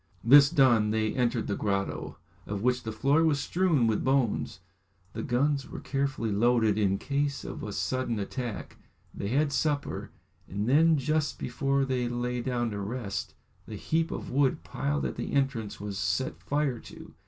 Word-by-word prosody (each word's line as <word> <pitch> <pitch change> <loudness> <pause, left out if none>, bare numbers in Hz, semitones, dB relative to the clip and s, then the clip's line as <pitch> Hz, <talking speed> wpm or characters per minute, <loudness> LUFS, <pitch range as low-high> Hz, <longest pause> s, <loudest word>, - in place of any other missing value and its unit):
This 140 +4 +8
done, 120 -9 +4
they 110 0 0
entered 120 -2 0
the 100 - -2
grotto, 100 -2 -2 0.3
of 100 0 -4
which 125 0 +2
the 110 - -5
floor 140 +8 +2
was 155 -3 +2
strewn 165 -4 +2
with 110 -2 +1
bones, 130 -7 0 0.5
the - - -4
guns 140 +2 0
were - - -7
carefully 135 -5 -2
loaded, 110 0 +3
in 100 -2 +1
case 140 +2 -2
of - - -6
a - - -5
sudden 130 -3 -1
attack, 115 +2 -5 0.4
they 100 - -4
had 140 +6 +1
supper, 145 0 -1 0.4
and 100 +3 -3
then 160 +4 +5
just 150 +2 0
before 140 0 0
they 125 -2 -1
lay 120 0 -2
down 120 -2 -1
to 100 - -4
rest, 100 0 -4 0.3
the - - -7
heap 165 +1 0
of - - -5
wood 135 0 +1
piled 70 -1 -2
at 65 - -3
the - - -4
entrance 135 -7 -1
was 100 -1 -5
set 95 +6 -1
fire 145 -4 -1
to. - - -12
125 Hz, 170 wpm, -28 LUFS, 110-140 Hz, 0.5 s, This